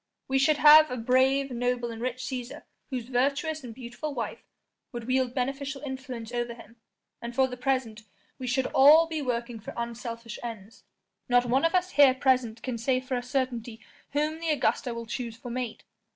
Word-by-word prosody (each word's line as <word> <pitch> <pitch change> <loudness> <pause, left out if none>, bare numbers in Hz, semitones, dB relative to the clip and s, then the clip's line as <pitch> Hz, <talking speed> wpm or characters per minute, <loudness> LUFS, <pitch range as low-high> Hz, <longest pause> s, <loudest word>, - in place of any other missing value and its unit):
We 270 0 +2
should 290 +2 +3
have 305 +1 +8
a 250 - -4
brave, 260 +3 +2
noble 245 0 -1
and 225 0 -8
rich 255 +1 -3
Cæsar 250 -2 -5 0.3
whose 255 -4 -3
virtuous 280 +5 0
and 245 - -7
beautiful 255 +5 -6
wife 235 - -4 0.5
would 240 -2 -6
wield 255 0 0
beneficial 275 +2 -3
influence 260 -4 -6
over 240 -1 -3
him, 235 0 -15 0.4
and 235 0 -6
for 265 +1 +4
the 250 - -6
present 250 -4 -1 0.4
we 255 - -5
should 260 +1 +1
all 300 +5 +8
be 320 -2 -4
working 240 -3 -3
for 210 - -9
unselfish 235 -1 -5
ends; 225 -3 -9 0.4
not 245 0 +4
one 260 +6 +2
of 330 - +2
us 365 0 +1
here 275 -3 +6
present 255 -4 +1
can 250 -3 -3
say 255 +2 +1
for 255 0 -4
a 245 - -1
certainty 245 -3 -3 0.3
whom 305 +2 0
the 330 0 -3
Augusta 275 -3 +1
will 235 0 -5
choose 230 0 -5
for 240 +1 -8
mate. 245 -2 -4
255 Hz, 185 wpm, -27 LUFS, 235-270 Hz, 0.5 s, have